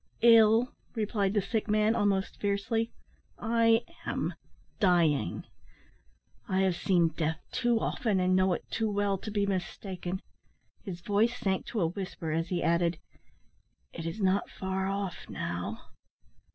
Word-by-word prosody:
"Ill!" 230 +1 +6 0.2
replied 210 -2 0
the 205 - +2
sick 220 +2 -1
man, 215 +1 +3
almost 200 -3 0
fiercely, 205 +3 0 0.5
"I 230 0 +3 0.2
am - - -2 0.5
dying. 170 - +2 1.1
I 190 0 +2
have 190 -2 +2
seen 175 -2 +3
death 160 0 -1
too 240 -2 +2
often, 215 -3 0
and 185 0 +3
know 185 0 +3
it - - -4
too 225 -1 0
well, 200 -1 0
to 215 - -6
be 205 -1 +1
mistaken." 185 -1 -3 0.6
His 180 -5 -6
voice 215 +6 +2
sank 190 -1 -1
to 220 - -2
a 165 - +3
whisper 180 -2 -5
as 165 +2 0
he 175 0 -1
added, 170 0 +2 1.0
"It 165 0 -5
is 165 +6 -5
not 195 0 +1
far 190 0 -2
off 195 -2 -4
now." - - -4
195 Hz, 140 wpm, -30 LUFS, 180-215 Hz, 1.1 s, Ill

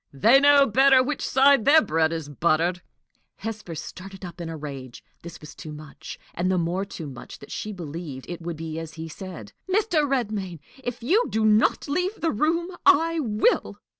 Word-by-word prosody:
They 225 - +5
know 285 0 +6
better 265 +2 +5
which 280 +2 -3
side 275 -2 +4
their 290 +6 +7
bread 160 0 +1
is 160 -3 -4
buttered." 170 +4 0 0.5
Hesper 215 -7 -6
started 190 +4 -9
up 175 0 -9
in 165 - -5
a 165 - -6
rage. 135 -5 -8 0.2
This 170 -1 -10
was 150 - -11
too 155 - -9
much 150 -1 -10 0.2
and 180 +2 -1
the 185 - +1
more 175 +3 -1
too 170 -4 -8
much, 130 -4 -9
that 140 - -13
she 215 - -4
believed 160 -6 -7
it 175 -1 -7
would 165 -1 -5
be 160 0 -5
as 165 -1 -8
he 160 0 -6
said. 160 - -9 0.2
"Mr. 360 -8 +2
Redmain, 210 -9 -2 0.3
if 245 -1 -5
you 400 - +3
do 220 0 0
not 215 +7 +3
leave 360 +8 -1
the 330 - 0
room, 335 - 0
I 330 -2 +4
will." 230 - +1
190 Hz, 190 wpm, -24 LUFS, 160-275 Hz, 0.5 s, their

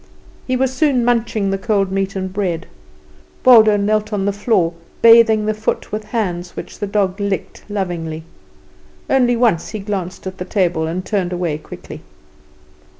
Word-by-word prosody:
He 255 - +1
was 260 0 0
soon 260 -3 +2
munching 230 -4 +1
the 195 - -1
cold 200 -3 0
meat 195 0 -1
and 190 -1 -4
bread. 185 -4 -2 0.8
Waldo 220 -4 +7
knelt 215 +1 0
on 200 -2 -1
the 200 - +1
floor, 195 -5 +1 0.3
bathing 225 -2 +7
the 215 - +1
foot 215 +1 -3
with 215 0 -4
hands 180 -6 -3
which - - -8
the 205 - -2
dog 195 -1 0
licked 200 -1 -3
lovingly. 170 -6 -3 0.8
Once - - +1
only 240 -7 +3 0.2
he 195 - -10
glanced 190 -3 -4
at 190 0 -6
the 180 - -4
table, 180 -5 0
and 180 +3 -4
turned 190 -4 -1
away 175 -4 -2
quickly. - - -10
200 Hz, 160 wpm, -18 LUFS, 185-220 Hz, 0.8 s, Waldo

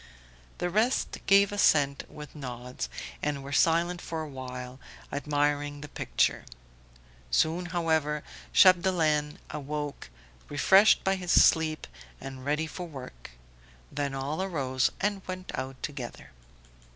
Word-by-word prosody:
The 175 - -2
rest 220 +7 +1
gave 200 0 +6
assent 145 -8 +3
with 150 0 -11
nods, 125 -3 -6 0.3
and 145 -2 -2
were 140 - -8
silent 170 +4 +2
for 160 -1 -4
a - - -6
while, 125 -2 -7 0.3
admiring 145 0 -1
the 150 - -7
picture. - - 0 0.9
Soon 165 - +1
however 160 -4 0 0.3
Chapdelaine 170 -5 +4
awoke, 145 - -5 0.4
refreshed 190 +8 +5
by 190 0 +1
his 180 -2 -3
sleep 160 -1 +4 0.3
and 130 -1 -8
ready 150 +3 0
for 175 +2 -7
work; 125 - -10 0.6
then 140 -1 -2
all 140 +6 -2
arose 135 -9 0
and 200 0 0
went 185 0 -6
out 130 0 -5
together. 135 -5 -6
150 Hz, 120 wpm, -28 LUFS, 140-175 Hz, 0.9 s, gave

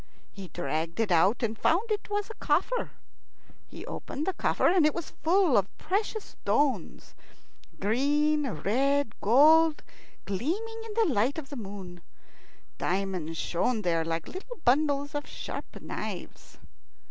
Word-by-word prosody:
He 195 -2 -9
dragged 165 +1 -3
it 220 -4 +1
out, 190 +8 +4
and 225 -1 0
found 390 - +1
it 420 0 -2
was 415 +1 -2
a - - -12
coffer. 365 +11 +1 0.8
He - - -10
opened 295 - -5
the 380 - 0
coffer, - - +1
and 355 -1 +4
it 305 - +3
was 340 -2 -5
full 350 -4 +4
of 195 -1 +1
precious 415 +2 -1
stones 285 -3 -1 0.7
green, 290 +7 +2
red, 270 +4 +1
gold 310 +7 +5 0.4
gleaming 375 - -3
in 440 - -7
the 440 - +3
light 240 +8 +1
of 290 -3 -6
the 285 - -7
moon. 195 -6 -8 0.8
Diamonds 180 -4 -2
shone 215 +8 0
there 165 -2 +1
like 165 0 -3
little 440 +7 -8
bundles 285 +2 +2
of 290 0 -3
sharp - - -7
knives. - - -7
280 Hz, 140 wpm, -28 LUFS, 200-335 Hz, 0.8 s, gold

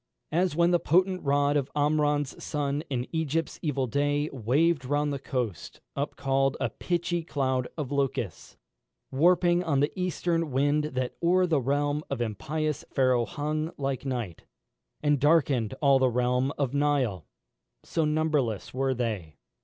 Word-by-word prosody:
As 175 0 +1
when 170 +1 +3
the 175 - +4
potent 185 +3 +2
rod 145 0 +2
Of 140 -2 0
Amram's 145 -1 +1
son, 145 -1 -1
in 125 -3 -1
Egypt's 160 -1 -1
evil 140 -4 0
day, 145 +4 0
Waved 140 +6 +2
round 145 +2 0
the 140 - -3
coast, 125 - -4 0.2
up 140 +1 -3
call'd 135 0 +1
a - - -1
pitchy 175 -1 -2
cloud 130 -5 -1
Of 145 -4 -4
locusts, 135 - -2 0.5
warping 175 +4 +3
on 145 -5 +1
the 145 +2 +1
eastern 175 -3 -1
wind 145 +3 +1
That 130 -4 -3
o'er 180 +2 +4
the 160 -6 +1
realm 145 +3 0
of - - -3
impious 150 +7 -2
Pharaoh 130 -3 +2
hung 155 +4 -2
Like 135 -2 -2
night, 120 -10 -4 0.6
and 145 -1 +3
darken'd 140 -6 +2
all 140 -1 +5
the 130 -1 +3
realm 125 +2 +1
of 140 -3 -1
Nile, 140 - 0 0.6
So 165 - -1
numberless 150 -8 0
were 135 0 0
they. 105 - -3
145 Hz, 150 wpm, -27 LUFS, 130-155 Hz, 0.6 s, all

